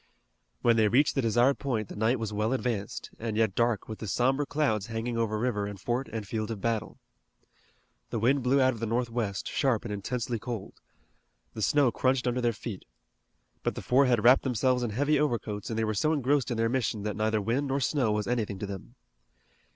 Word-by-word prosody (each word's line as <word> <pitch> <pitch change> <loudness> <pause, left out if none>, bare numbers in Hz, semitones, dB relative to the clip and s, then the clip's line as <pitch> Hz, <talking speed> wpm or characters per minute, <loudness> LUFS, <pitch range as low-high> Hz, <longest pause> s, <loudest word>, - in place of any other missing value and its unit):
When 115 -1 +4
they 110 -1 +4
reached 130 +7 +3
the 135 - +1
desired 120 +4 +3
point 115 -7 -2
the - - -9
night 110 +5 +2
was 110 -2 -4
well 105 +4 0
advanced, 120 -6 -3
and 110 -1 -3
yet 110 -3 +2
dark 115 -2 +1
with 110 - -7
the 110 - -5
somber 135 +8 +1
clouds 135 -9 0
hanging 115 +1 -3
over 115 -2 0
river 105 -3 -1
and 100 -1 -7
fort 125 +6 -2
and 110 -2 -5
field 110 0 -3
of 110 -3 -4
battle. 110 +1 -2 1.1
The - - -2
wind 130 +5 +2
blew 130 +3 +3
out 130 0 +4
of 115 - -9
the 115 - -2
northwest, 115 -3 -1
sharp 130 -7 0
and 105 - -3
intensely 115 +3 -3
cold. 110 -2 -5 0.8
The 110 - -6
snow 135 +4 +3
crunched 130 0 +1
under 125 +1 0
their 120 -1 +2
feet. 110 -3 -7 0.8
But - - -1
the - - -6
four 135 +2 +4
had 120 -4 +2
wrapped 125 +3 +7
themselves 125 0 +1
in 120 - -1
heavy 145 +8 +1
overcoats, 115 -8 -1
and 110 - -3
they 110 - +1
were 110 - -1
so 155 +10 +1
engrossed 140 -1 +1
in 120 - -2
their 115 0 +2
mission 115 -4 -1
that 105 -1 -2
neither 110 +1 +1
wind 120 +8 0
nor 135 +1 0
snow 130 -4 +1
was 105 0 0
anything 110 -5 -1
to 105 - -4
them. 95 -12 -8
115 Hz, 215 wpm, -28 LUFS, 110-130 Hz, 1.1 s, wrapped